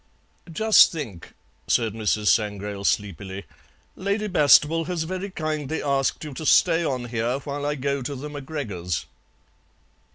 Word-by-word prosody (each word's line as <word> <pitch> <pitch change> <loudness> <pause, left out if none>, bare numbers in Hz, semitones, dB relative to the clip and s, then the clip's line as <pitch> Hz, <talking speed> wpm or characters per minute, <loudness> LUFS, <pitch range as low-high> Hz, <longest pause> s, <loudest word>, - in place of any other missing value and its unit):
"Just 220 +6 +6
think," 115 - -7 0.3
said 115 -3 +1
Mrs. 110 -1 -1
Sangrail 105 -2 0
sleepily; 100 -1 -2 0.5
"Lady 200 +3 -1
Bastable 160 -1 +4
has 175 -1 -2
very 185 +4 -4
kindly 155 -4 -3
asked 140 0 0
you 150 -2 -7
to 145 - -7
stay 170 -1 +4
on 130 -6 -2
here 120 +2 -1
while 145 0 -4
I 150 - -1
go 140 0 -2
to 140 +3 -4
the 140 +3 -6
MacGregors'." 130 - -4
140 Hz, 135 wpm, -24 LUFS, 110-160 Hz, 0.5 s, Just